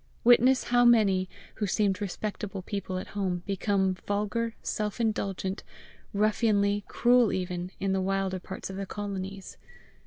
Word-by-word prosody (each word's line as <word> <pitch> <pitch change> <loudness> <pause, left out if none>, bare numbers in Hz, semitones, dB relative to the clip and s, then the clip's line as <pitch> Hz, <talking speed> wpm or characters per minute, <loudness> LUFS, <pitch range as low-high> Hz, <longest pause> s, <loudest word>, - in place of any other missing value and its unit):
Witness 250 +2 +6
how 245 0 +3
many, 200 -6 +4 0.3
who 210 - -1
seemed 200 0 +1
respectable 200 0 -4
people 190 -2 -4
at 185 - -6
home, 185 -3 -2
become 195 -1 +1
vulgar, 210 +4 -2
self 210 +1 -2
indulgent, 195 -3 -1 0.5
ruffianly, 205 -1 +2
cruel 245 -2 +4
even, 180 -1 -3
in 195 0 0
the 190 - +1
wilder 190 0 -1
parts 190 +1 -7
of 190 - -7
the 195 -1 -4
colonies! 195 -2 -6
200 Hz, 135 wpm, -28 LUFS, 190-215 Hz, 0.5 s, Witness